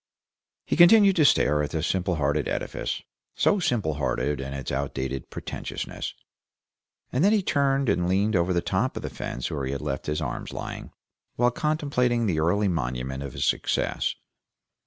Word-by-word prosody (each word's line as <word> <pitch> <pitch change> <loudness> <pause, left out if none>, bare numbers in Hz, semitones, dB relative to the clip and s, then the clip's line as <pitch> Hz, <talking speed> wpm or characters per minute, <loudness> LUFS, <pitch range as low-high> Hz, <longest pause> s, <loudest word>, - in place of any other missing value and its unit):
He - - 0
continued 195 +3 +7
to 155 - +5
stare 75 - +4
at 75 - -2
the 80 -1 -2
simple 90 -1 0
hearted 75 -1 0
edifice, - - -3 0.3
so 205 - +3
simple 115 - 0
hearted 70 0 -1
in 65 0 -5
its 70 -1 -5
out 70 0 -2
dated 65 0 -4
pretentiousness, - - -5 1.0
and 130 +5 +1
then 200 - +5
he 210 -3 +2
turned 140 -4 +1
and 90 -1 +1
leaned 100 +3 +2
over 90 +1 +2
the 85 -1 +2
top 105 +8 0
of - - -5
the - - -4
fence 65 - -4
where 70 -3 -3
he 65 - -2
had 70 - -4
left 65 - -4
his 75 +1 -1
arms 65 -7 -4
lying, - - -6 0.4
while 120 +1 +3
contemplating 125 -5 0
the 85 -7 +1
early 100 +6 +2
monument 65 -5 -2
of 70 -2 -6
his - - -1
success. - - 0
85 Hz, 180 wpm, -26 LUFS, -, 1.0 s, continued